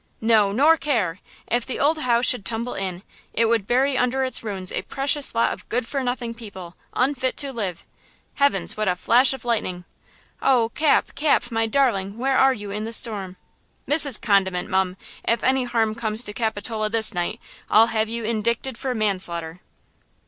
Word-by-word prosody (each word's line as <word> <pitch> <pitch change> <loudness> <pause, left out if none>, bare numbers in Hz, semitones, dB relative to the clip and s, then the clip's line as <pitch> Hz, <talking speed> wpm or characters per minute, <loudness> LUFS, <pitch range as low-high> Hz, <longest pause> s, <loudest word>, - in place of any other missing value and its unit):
"No, 220 -3 +3
nor 295 +9 +4
care! 225 - -1 0.3
If 240 +1 0
the 260 - -5
old 310 +2 +2
house 240 -3 +2
should 245 -5 +2
tumble 230 +3 -4
in, 185 -1 -4 0.3
it 230 - +2
would 225 -3 +1
bury 260 +2 +2
under 250 +2 +1
its 260 -2 -1
ruins 195 -4 -2
a - - -2
precious 280 -1 0
lot 230 - +2
of - - -13
good 240 0 -1
for 275 +3 -3
nothing 245 -2 -3
people, 190 -7 -10 0.2
unfit 260 0 0
to 275 -2 -1
live! 195 -8 -4 0.5
Heavens! 280 -11 +1
what 215 -1 -2
a 180 - +2
flash 240 +8 +4
of 265 -3 -5
lightning! 185 -7 -2 0.6
Oh, 245 -4 +3
Cap, 300 +4 +1
Cap, 285 -5 +1
my 225 0 0
darling, 220 -6 0
where 265 +2 0
are 265 +1 +5
you 205 -3 -8
in 210 +1 -4
this 225 0 0
storm? 200 -6 -3 0.5
Mrs. 290 -4 +3
Condiment, 190 -4 +1
mum! 190 0 0 0.3
if 230 - 0
any 260 0 +2
harm 225 -3 0
comes 220 0 +1
to 205 - -3
Capitola 220 -1 -2
this 225 0 +2
night, 175 -1 -2 0.3
I'll 220 +1 +6
have 220 0 0
you 230 0 -4
indicted 230 +3 -1
for 260 -2 -2
manslaughter!" 180 -6 -1
230 Hz, 180 wpm, -23 LUFS, 205-255 Hz, 0.6 s, I'll